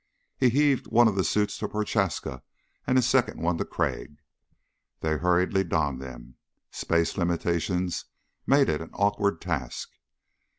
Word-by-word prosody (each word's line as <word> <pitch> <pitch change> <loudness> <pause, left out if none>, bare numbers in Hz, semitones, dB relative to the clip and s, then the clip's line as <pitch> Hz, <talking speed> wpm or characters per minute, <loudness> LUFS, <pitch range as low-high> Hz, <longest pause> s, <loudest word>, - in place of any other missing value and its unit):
He 130 - +3
heaved 140 +1 +2
one 120 +1 +5
of 110 - +1
the 95 -1 +1
suits 105 +2 0
to - - -2
Prochaska 105 -3 -1 0.5
and 130 - +3
a 130 - +4
second 130 0 +2
one 85 0 0
to - - -1
Crag. 75 - -3 0.8
They 80 -1 0
hurriedly 90 +3 +2
donned 75 -6 -1
them. 60 -2 -10 0.3
Space 85 +2 0
limitations 85 +1 -1 0.4
made 140 0 +5
it 75 - 0
an 80 - -8
awkward 100 -3 +1
task. 75 -9 -4
90 Hz, 140 wpm, -27 LUFS, 80-105 Hz, 0.8 s, one